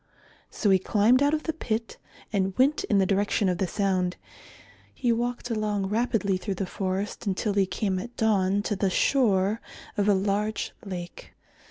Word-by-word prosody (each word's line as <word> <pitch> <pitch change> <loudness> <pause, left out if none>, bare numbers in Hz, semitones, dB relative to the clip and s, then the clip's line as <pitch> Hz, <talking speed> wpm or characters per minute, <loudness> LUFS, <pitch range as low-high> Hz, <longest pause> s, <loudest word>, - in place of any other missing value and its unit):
So 205 - +1
he 190 - +5
climbed 220 +7 +3
out 290 +2 +3
of 305 - -4
the 320 - -2
pit 225 -7 -3 0.4
and 190 -2 0
went 280 +4 +3
in 205 - +2
the 195 - +4
direction 200 +1 +1
of 180 - -1
the 190 - +1
sound. 185 -2 0 0.8
He 245 -3 +1
walked 240 +1 -2
along 210 -3 -1
rapidly 210 -3 +1
through 195 +1 -4
the 195 - -2
forest 195 +3 -3
until 200 +2 0
he 195 -1 +2
came 190 -1 -1
at 240 +5 -8
dawn 205 -3 +2
to 210 - -1
the 195 0 +1
shore 205 -2 +2 0.4
of 205 0 +2
a 205 - +5
large 205 +3 -1
lake. 175 -3 -8
205 Hz, 175 wpm, -26 LUFS, 190-225 Hz, 0.8 s, he